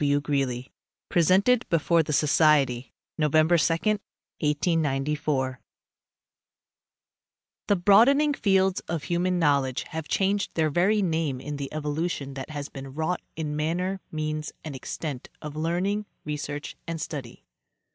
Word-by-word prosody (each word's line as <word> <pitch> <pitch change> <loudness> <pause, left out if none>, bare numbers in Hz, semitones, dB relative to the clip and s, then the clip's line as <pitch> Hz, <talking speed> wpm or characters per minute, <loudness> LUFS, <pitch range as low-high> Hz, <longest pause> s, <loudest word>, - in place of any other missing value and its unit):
W. 145 0 +3
GREELY 135 -4 -2 0.4
(Presented 195 +9 +3
before 165 0 +3
the 155 - -4
Society 145 -4 +3 0.3
November 155 +2 +4
2, 165 0 +3
1894) 150 - -1 2.1
The 205 - +4
broadening 235 +11 +5
fields 190 -6 +2
of 160 -3 -3
human 180 +1 0
knowledge 140 -6 +1
haye 160 - -3
changed 195 +5 0
their 155 -2 +2
very 195 +6 +3
name 160 -6 0
in 145 +2 -5
the 140 -1 -5
evolution 150 -1 -2
that 135 +2 -6
has 145 -2 -5
been 135 -1 -9
wrought 160 +3 -1
in 150 -2 -3
man 155 +3 0
ner, 190 +2 -2
means 155 -1 -3
and 155 -3 -6
extent 130 +1 -5
of 150 -1 -7
learning, 180 +6 -1 0.2
research 145 -1 -4
and 165 -1 -3
study. 140 -6 -6
155 Hz, 125 wpm, -26 LUFS, 145-175 Hz, 2.1 s, broadening